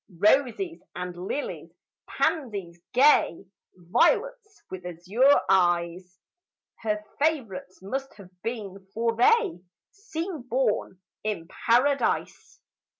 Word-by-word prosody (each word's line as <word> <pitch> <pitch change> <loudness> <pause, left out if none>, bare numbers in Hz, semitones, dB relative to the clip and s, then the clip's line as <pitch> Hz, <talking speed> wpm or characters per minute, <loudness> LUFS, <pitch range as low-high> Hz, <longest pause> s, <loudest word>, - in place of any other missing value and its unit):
Roses 270 - +2
and 180 0 -5
lilies, 290 - -4 0.4
pansies 200 - -2
gay, 255 - +4 0.3
Violets 420 - +1
with 185 -1 -6
azure 190 - +3
eyes, 180 0 +1 0.6
Her 210 -1 -2 0.2
favorites 250 -12 -1
must 270 +7 -4
have 195 -3 -14
been, 200 -5 -6
for 230 0 0
they 420 - +3 0.3
Seem 375 - -5
born 230 -6 0 0.2
in 205 -6 -3 0.2
paradise. 265 +5 +1
225 Hz, 90 wpm, -26 LUFS, 185-285 Hz, 0.6 s, gay